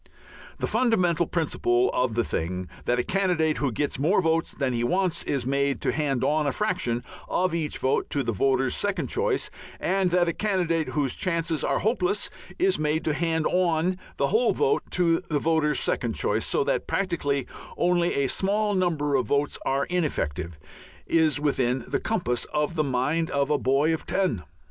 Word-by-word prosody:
The - - -1
fundamental 180 -9 +2
principle 125 -7 +1
of 125 -3 0
the 120 - +2
thing, 90 0 -3 0.2
that 120 - +1
a 125 - +1
candidate 175 -5 +1
who 140 -3 0
gets 140 +3 -2
more 165 +9 +3
votes 165 -2 +1
than 135 -3 -1
he 120 0 -1
wants 180 +6 +1
is 135 -4 -1
made 140 +1 0
to - - +1
hand 140 -5 -1
on 150 0 +2
a - - +2
fraction 175 - -1 0.3
of 185 -1 +1
each 160 -3 -1
vote 130 - 0
to 140 - 0
the 115 - -1
voter's 130 +4 +1
second 205 -1 -1
choice, 440 0 0 0.3
and 190 -1 +1
that 175 0 +2
a 170 - 0
candidate 175 -6 0
whose 140 -4 +1
chances 165 -3 -1
are - - +1
hopeless 310 - 0 0.3
is 375 +2 +2
made 155 +1 0
to 155 - +1
hand 160 +1 0
on 180 0 +1 0.2
the - - +1
whole 455 +3 +3
vote 445 -1 +2
to 170 -2 +2
the 150 - -2
voter's 155 -1 +1
second - - -1
choice, - - 0
so 460 - +1
that - - -1
practically 145 -8 -1 0.3
only 175 -1 +2
a 140 -1 +1
small 205 +7 0
number 165 -6 0
of 130 -3 +1
votes 145 0 0
are 135 +1 +1
ineffective, 85 - -2 0.5
is 160 -3 +2
within 130 -4 0
the - - -1
compass 175 - -1
of 150 +2 -1
the 155 -2 +1
mind 145 +5 0
of 140 +1 0
a 150 - +2
boy 140 +5 +2
of 160 - -5
ten. 185 - 0
160 Hz, 180 wpm, -26 LUFS, 135-180 Hz, 0.5 s, more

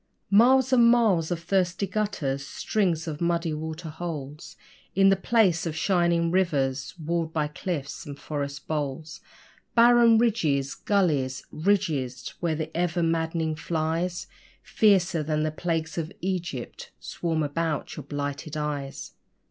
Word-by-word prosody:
Miles 255 +5 +5
and 240 -2 +6
miles 215 -9 +3
of 170 -2 -3
thirsty 185 +1 +1
gutters 180 -10 -2
strings 175 -1 -1
of 155 -1 -5
muddy 170 -1 0
water 160 +2 -5
holes 150 -3 -7 0.4
In 195 0 +6
the 195 - +5
place 190 -4 +2
of 155 - -3
'shining 170 -1 +2
rivers' 135 -8 0
'walled 165 0 -2
by 155 -2 0
cliffs 150 -2 -5
and 140 -1 -8
forest 140 -1 -5
boles.' 150 0 -4 0.5
Barren 235 -1 +6
ridges, 160 - +1
gullies, 150 -10 0
ridges! 155 -9 -1
where 165 -3 0
the 160 +1 -5
ever 175 0 0
madd'ning 165 -1 0
flies 165 +2 -2 0.4
Fiercer 190 -6 +3
than 155 0 -1
the 155 - 0
plagues 165 0 -2
of 160 +2 -4
Egypt 175 -9 -4
swarm 160 -2 -2
about 150 0 -2
your 150 - -7
blighted 145 +2 -4
eyes! 145 -2 -4
165 Hz, 130 wpm, -26 LUFS, 150-185 Hz, 0.5 s, and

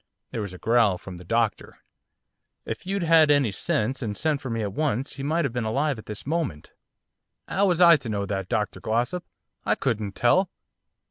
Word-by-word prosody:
There 115 - -3
was 100 -2 -5
a 90 - -9
growl 115 -3 +3
from 90 0 -9
the 90 - -11
doctor. 115 +2 -1 0.9
'If - - -6
you'd 195 -1 -1
had 160 -2 +5
any 140 -6 +4
sense, 110 +6 -1
and 105 -4 -3
sent 155 -3 0
for 130 - -5
me 115 -1 -2
at 100 -2 -3
once, 135 -1 -1
he 140 - -7
might 155 +3 0
have 130 - -2
been 120 -1 -1
alive 135 +4 0
at - - -13
this 105 -1 -6
moment.' 145 - -3 0.8
''Ow 200 +1 +2
was 175 -1 +1
I 170 -2 +8
to 130 -5 -7
know 100 -2 -1
that, 95 -2 -3
Dr 105 -3 -1
Glossop? 125 +11 -1 0.4
I - - +2
couldn't 110 -6 -2
tell. 180 +10 +3
120 Hz, 200 wpm, -25 LUFS, 105-155 Hz, 0.9 s, I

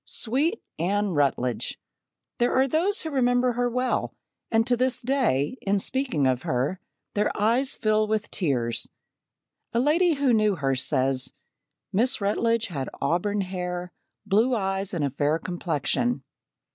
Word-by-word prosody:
Sweet 280 - -1 0.2
Anne 200 +4 +1
Rutledge! 135 -6 0 0.6
There 240 0 +2
are 265 +1 +4
those 355 - +1
who 320 - -4
remember 245 -2 +2
her 245 +1 0
well, 250 +1 0 0.4
and 225 0 +3
to 245 - +2
this 255 +1 +1
day 250 - +1
in 200 +1 +1
speaking 245 - 0
of 130 -1 +2
her, 130 +11 -1 0.3
their 210 - +1
eyes 235 +6 +2
fill 215 0 +2
with 215 -1 -1
tears. 125 - -1 0.8
A 235 - +2
lady 325 +6 +3
who 275 -3 +2
knew 215 -2 +3
her 135 -4 0
says: 130 -1 0 0.6
"Miss 245 +7 +2
Rutledge 225 +3 +1
had 140 -7 -4
auburn 180 +8 0
hair, 180 -1 -4 0.3
blue 230 +6 +3
eyes, 195 -1 -1
and 155 -4 0
a 140 - -1
fair 145 +3 +1
complexion. 175 - -1
210 Hz, 145 wpm, -26 LUFS, 160-245 Hz, 0.8 s, are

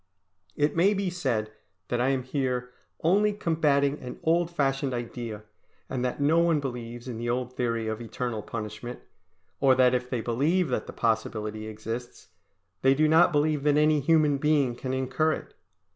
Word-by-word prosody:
It 145 0 +1
may 195 +5 +4
be 195 -2 -1
said 120 -11 -1 0.4
that 120 0 0
I 130 - +2
am 135 -2 0
here 125 -2 -2 0.3
only 205 +5 +3
combating 150 -6 +1
an 125 -1 -8
old 170 +1 +2
fashioned 135 -5 0
idea, 115 -3 -5 0.5
and 125 -2 -2
that 125 +2 -2
no 150 +4 +3
one 170 -2 +3
believes 120 -3 -6
in 120 -3 -5
the 120 0 -3
old 125 +1 -2
theory 115 -2 -1
of 110 +1 -3
eternal 120 -1 -4
punishment, 105 +3 -6 0.6
or 135 -2 +5
that 130 -1 +4
if 125 0 -1
they 125 -3 -1
believe 145 +9 +1
that 125 - -2
the - - -6
possibility 110 -1 -1
exists, 115 +3 -7 0.5
they 135 +1 +4
do 155 +2 +3
not 160 +3 +5
believe 150 -1 +1
that 145 0 +3
any 150 0 +4
human 150 -1 +3
being 145 -4 +2
can 130 +1 -5
incur 130 +4 +1
it. - - -8
130 Hz, 175 wpm, -27 LUFS, 120-155 Hz, 0.6 s, or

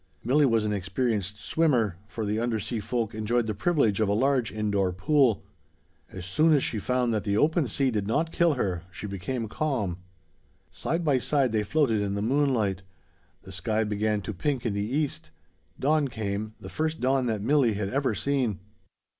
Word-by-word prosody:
Milli 140 +3 +4
was 115 -2 +2
an 105 - 0
experienced 100 +1 -1
swimmer, 125 - +1
for 110 0 -4
the 105 +2 -1
undersea 115 0 -2
folk 115 +1 -2
enjoyed 110 +2 0
the 110 - -2
privilege 115 - +1
of 110 -2 +2
a - - +2
large 130 +1 +2
indoor 100 -3 0
pool. 120 +4 +2 0.7
As 95 -2 -7
soon 155 - +3
as 140 - +2
she 110 - 0
found 125 +1 0
that 105 - -1
the 100 -1 0
open 155 +2 +2
sea 135 +2 +1
did 105 -3 -1
not 160 +9 0
kill 170 -3 +3
her, 95 -8 -1
she 95 - -7
became 105 +5 -3
calm. 105 - -2 0.7
Side 165 +2 -2
by 140 -4 +3
side 135 -1 +1
they 110 -1 +1
floated 115 -1 +1
in 100 -1 -1
the 100 - -2
moonlight. 115 -7 +1 0.6
The 95 - -11
sky 105 +4 -1
began 105 0 0
to 110 - -4
pink 130 +7 -2
in 110 - 0
the 100 - -1
east. 125 - -2 0.5
Dawn 150 +1 +2
came, 110 -2 -4
the - - -9
first 160 0 -2
dawn 130 0 +1
that 110 -3 -1
Milli 130 -3 +3
had 100 -1 -2
ever 135 -3 0
seen. 125 -4 0
115 Hz, 185 wpm, -27 LUFS, 105-135 Hz, 0.7 s, Milli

